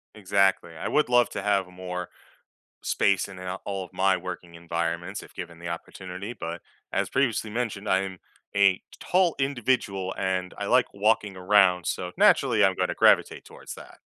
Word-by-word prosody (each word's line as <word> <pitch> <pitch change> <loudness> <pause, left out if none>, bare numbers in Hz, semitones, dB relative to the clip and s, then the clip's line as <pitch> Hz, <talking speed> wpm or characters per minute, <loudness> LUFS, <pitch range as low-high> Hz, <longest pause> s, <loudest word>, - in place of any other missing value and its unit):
Exactly. 95 -4 +2
I 80 - -4
would 150 -4 +2
love 120 0 +4
to - - -4
have 100 -2 +1
more 90 0 -6 0.7
space 100 -1 +1
in, 95 -2 -10
uh, 90 +1 -5
all 95 -2 -3
of 85 - -16
my 95 0 +3
working 90 -1 -7
environments 85 0 -3
if - - -15
given 85 -1 -8
the 85 - -7
opportunity, 90 +4 -6
but, 85 -7 -6 0.3
as - - 0
previously 115 -5 0
mentioned, 110 -3 -3
I 95 - +3
am 95 -2 -6 0.4
a 100 -2 +4 0.2
tall 180 -2 +2
individual, 120 -8 0
and 95 -1 -2
I 100 - -4
like 125 +3 +4
walking 105 -1 +1
around, 90 -2 +4
so 90 -1 -3
naturally, - - +4
I'm - - +3
gonna - - 0
gravitate - - +3
towards - - -10
that. - - -13
95 Hz, 170 wpm, -26 LUFS, 90-105 Hz, 0.7 s, love